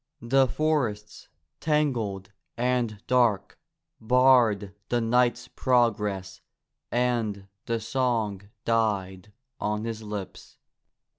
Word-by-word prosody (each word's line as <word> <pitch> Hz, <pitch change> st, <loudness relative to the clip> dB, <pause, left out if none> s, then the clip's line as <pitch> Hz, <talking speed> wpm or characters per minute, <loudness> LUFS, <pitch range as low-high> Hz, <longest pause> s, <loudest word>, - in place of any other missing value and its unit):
The 135 Hz, +3 st, +4 dB
forests, 120 Hz, -9 st, -2 dB, 0.3 s
tangled 120 Hz, -, -1 dB, 0.3 s
and 120 Hz, -4 st, -1 dB
dark, 120 Hz, -6 st, +1 dB, 0.4 s
barred 115 Hz, -4 st, +4 dB, 0.2 s
the 120 Hz, -, +1 dB
knight's 125 Hz, +1 st, +1 dB
progress 105 Hz, -8 st, 0 dB, 0.5 s
and 115 Hz, -5 st, 0 dB, 0.2 s
the 115 Hz, -1 st, 0 dB
song 115 Hz, -4 st, -1 dB, 0.2 s
died 105 Hz, -4 st, -1 dB, 0.3 s
on 105 Hz, 0 st, -2 dB
his 115 Hz, -1 st, -4 dB
lips. 105 Hz, -3 st, -8 dB
115 Hz, 85 wpm, -26 LUFS, 105-125 Hz, 0.5 s, The